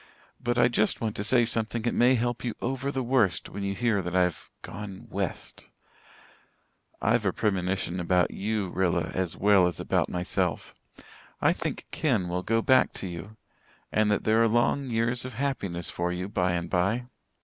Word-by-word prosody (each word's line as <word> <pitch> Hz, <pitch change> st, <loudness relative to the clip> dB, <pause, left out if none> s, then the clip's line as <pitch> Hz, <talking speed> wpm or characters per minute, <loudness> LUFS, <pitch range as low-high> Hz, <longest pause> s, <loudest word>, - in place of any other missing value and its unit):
But 120 Hz, 0 st, -1 dB
I 120 Hz, 0 st, +6 dB
just 110 Hz, -3 st, +1 dB
want 110 Hz, -2 st, -2 dB
to 105 Hz, -, -2 dB
say 120 Hz, +2 st, +3 dB
something 115 Hz, 0 st, -2 dB
that 120 Hz, -, 0 dB
may 125 Hz, +2 st, +4 dB
help 120 Hz, 0 st, -1 dB
you 120 Hz, -3 st, -2 dB
over 135 Hz, +2 st, -2 dB
the 135 Hz, -2 st, -2 dB
worst 115 Hz, -8 st, +1 dB
when 100 Hz, -, -6 dB
you 100 Hz, 0 st, -2 dB
hear 115 Hz, -4 st, +1 dB
that 90 Hz, 0 st, -4 dB
I've 90 Hz, -2 st, +1 dB
gone 100 Hz, 0 st, -8 dB
'west.' -, -, -4 dB, 1.4 s
I've 110 Hz, +1 st, +3 dB
a 95 Hz, -, +2 dB
premonition 95 Hz, -3 st, -1 dB
about 90 Hz, +1 st, +2 dB
you, 100 Hz, -2 st, -2 dB
Rilla, 90 Hz, -3 st, 0 dB
as 90 Hz, -3 st, -2 dB
well 100 Hz, -3 st, +5 dB
as 90 Hz, -, -4 dB
about -, -, 0 dB
myself. 90 Hz, 0 st, -2 dB, 0.7 s
I -, -, +4 dB
think -, -, -4 dB
Ken 115 Hz, -, +1 dB
will 90 Hz, +1 st, -1 dB
go 115 Hz, +4 st, +1 dB
back 130 Hz, -1 st, +4 dB
to 95 Hz, -, -5 dB
you 90 Hz, +5 st, -8 dB, 0.5 s
and 110 Hz, 0 st, +2 dB
that 105 Hz, -, +1 dB
there 110 Hz, +1 st, +3 dB
are 115 Hz, -, +5 dB
long 120 Hz, +4 st, +1 dB
years 115 Hz, +2 st, +1 dB
of 130 Hz, -2 st, -7 dB
happiness 100 Hz, -10 st, -2 dB
for 85 Hz, 0 st, -1 dB
you 90 Hz, +1 st, -3 dB
by 90 Hz, -3 st, 0 dB
and 85 Hz, -1 st, -2 dB
by. 100 Hz, +7 st, 0 dB
105 Hz, 180 wpm, -27 LUFS, 90-120 Hz, 1.4 s, I